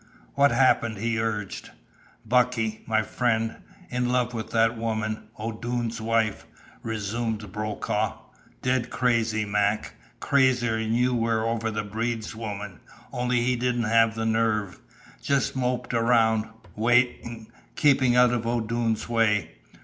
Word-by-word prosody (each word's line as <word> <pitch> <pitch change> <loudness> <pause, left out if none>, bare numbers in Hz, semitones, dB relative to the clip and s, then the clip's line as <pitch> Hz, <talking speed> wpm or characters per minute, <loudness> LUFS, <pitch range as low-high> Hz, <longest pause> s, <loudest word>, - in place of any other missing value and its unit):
"What 140 0 +4
happened?" 120 -3 +2
he 115 +2 -1
urged. 105 -3 -3 0.6
"Bucky 115 -2 +1
my 110 -1 +2
friend 115 +1 -1 0.3
in 125 0 0
love 125 -1 +1
with 110 -2 -5
that 115 +1 +2
woman, 110 -1 -3
O'Doone's 115 +1 -3
wife," 110 -2 0 0.3
resumed 110 -1 -3
Brokaw. 105 +1 -2 0.5
"Dead 125 -1 0
crazy, 115 -3 +1
Mac. 105 +1 0 0.3
Crazier'n 120 -5 +2
you 125 +1 +2
were 115 -1 +1
over 115 -1 -1
the 105 -1 -3
Breed's 110 +2 -3
woman, 105 -4 -6 0.3
only 125 -1 0
he 125 +1 +1
didn't 120 0 0
have 115 0 +3
the 110 0 -2
nerve. 110 -4 0 0.4
Just 140 -2 0
moped 125 -1 -1
around 115 -2 +3 0.3
waiting 115 0 +1 0.2
keeping 135 -5 +4
out 125 0 +6
of 115 -1 -2
O'Doone's 115 -1 -1
way. 115 -3 +1
115 Hz, 125 wpm, -26 LUFS, 110-120 Hz, 0.6 s, out